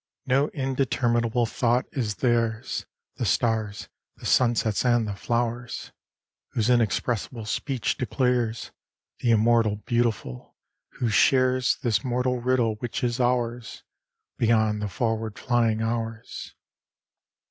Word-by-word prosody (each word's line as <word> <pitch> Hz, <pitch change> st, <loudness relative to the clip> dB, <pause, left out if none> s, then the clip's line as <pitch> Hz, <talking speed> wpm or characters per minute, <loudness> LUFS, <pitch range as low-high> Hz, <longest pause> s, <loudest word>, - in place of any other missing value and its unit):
No 135 Hz, +3 st, +3 dB
indeterminable 125 Hz, -4 st, 0 dB
thought 120 Hz, +1 st, +1 dB
is 110 Hz, -6 st, -2 dB
theirs, 115 Hz, 0 st, 0 dB, 0.3 s
The -, -, -1 dB
stars', 110 Hz, -3 st, 0 dB, 0.3 s
the -, -, -12 dB
sunsets' 115 Hz, -4 st, +2 dB
and 120 Hz, -3 st, +2 dB
the 105 Hz, -, -3 dB
flowers'; 120 Hz, +3 st, -3 dB, 0.6 s
Whose 115 Hz, +1 st, +1 dB
inexpressible 115 Hz, 0 st, 0 dB
speech 130 Hz, 0 st, -2 dB
declares 120 Hz, -1 st, 0 dB, 0.5 s
Th' -, -, -8 dB
immortal 115 Hz, -1 st, +4 dB
Beautiful, 115 Hz, -, -1 dB, 0.4 s
who 120 Hz, -, -1 dB
shares 130 Hz, +2 st, +3 dB
This 110 Hz, -6 st, +1 dB
mortal 125 Hz, 0 st, 0 dB
riddle 120 Hz, -3 st, +1 dB
which 120 Hz, +1 st, -4 dB
is 120 Hz, +1 st, 0 dB
ours, 120 Hz, -2 st, -1 dB, 0.6 s
Beyond 110 Hz, -2 st, +2 dB
the 105 Hz, -, -2 dB
forward 110 Hz, 0 st, -2 dB
flying 115 Hz, -3 st, +1 dB
hours. 115 Hz, -1 st, -4 dB
120 Hz, 110 wpm, -25 LUFS, 110-125 Hz, 0.6 s, immortal